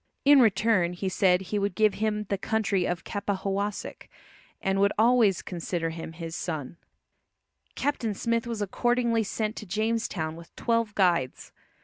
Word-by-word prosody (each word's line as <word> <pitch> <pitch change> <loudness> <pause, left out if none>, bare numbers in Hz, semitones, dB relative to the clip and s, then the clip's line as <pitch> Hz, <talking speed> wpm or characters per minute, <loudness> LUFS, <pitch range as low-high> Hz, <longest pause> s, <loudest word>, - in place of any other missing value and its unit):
In 285 0 +8
return 215 -5 +3
he 190 +2 -3
said 185 -1 +3
he 205 +2 -2
would 200 -2 -1
give 215 0 +3
him 210 0 -1
the 200 -1 -2
country 205 -4 0
of 175 -1 -3
Capahowosick, 200 0 -3 0.5
and 195 0 0
would 200 0 +4
always 225 -4 +4
consider 170 -2 -3
him 165 0 -7
his 165 0 -6
son. 155 -2 -4 1.0
Captain 240 -7 -1
Smith 230 +2 -1
was 225 -3 -2
accordingly 235 +2 +1
sent 215 +1 -2
to 210 - -7
Jamestown 210 -5 -1
with 170 0 -14
twelve 230 -2 0
guides. 170 -10 +1
200 Hz, 145 wpm, -27 LUFS, 180-225 Hz, 1.0 s, In